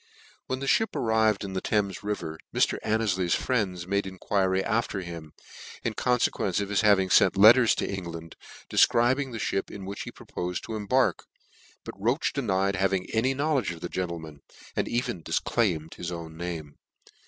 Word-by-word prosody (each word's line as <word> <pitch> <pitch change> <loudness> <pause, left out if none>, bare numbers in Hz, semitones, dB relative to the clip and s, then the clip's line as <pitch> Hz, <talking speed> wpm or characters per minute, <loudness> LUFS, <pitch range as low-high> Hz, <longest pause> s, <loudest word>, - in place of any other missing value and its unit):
When 130 +1 -3
the - - -2
(hip 210 +8 +2
arrived 110 -2 +2
in 95 -1 -5
the 95 - -2 0.4
river 85 -7 -4
Thame* - - -4
Mr. - - +2
Annefly's 100 -5 +1
friends 95 -9 -1
made 100 +1 -1
enquiry 95 0 0
after 110 -3 -1
him, 85 -3 -8 0.5
in - - -1
confequence 115 -6 +1
of 100 -1 -3
his 105 0 +2
having 100 -3 +4
fenc - - +5
letters 115 +4 +7
to - - -2
En 95 -2 -4
gland, 85 -1 -8 0.4
dcfcribing 130 +3 +3
the 115 - -5
fhip 95 -2 -2
in 100 -2 -8
which 100 +1 -6
he - - -6
propofed 90 0 -5
to 110 - -5
embark; 125 +5 +1 0.6
but - - -7
Roche 120 +10 0
denied 100 -7 0
having 95 -1 0
any 130 +4 +1
know 150 +3 0
ledge 125 - -1
of 85 -2 -6
the 85 - -4
gentleman; 85 -5 -5 0.3
and*cven 120 -7 -1
difclaimed 85 -9 0
his 90 0 -6
own 85 -2 -7
name. 80 -4 -6
100 Hz, 170 wpm, -27 LUFS, 90-115 Hz, 0.6 s, letters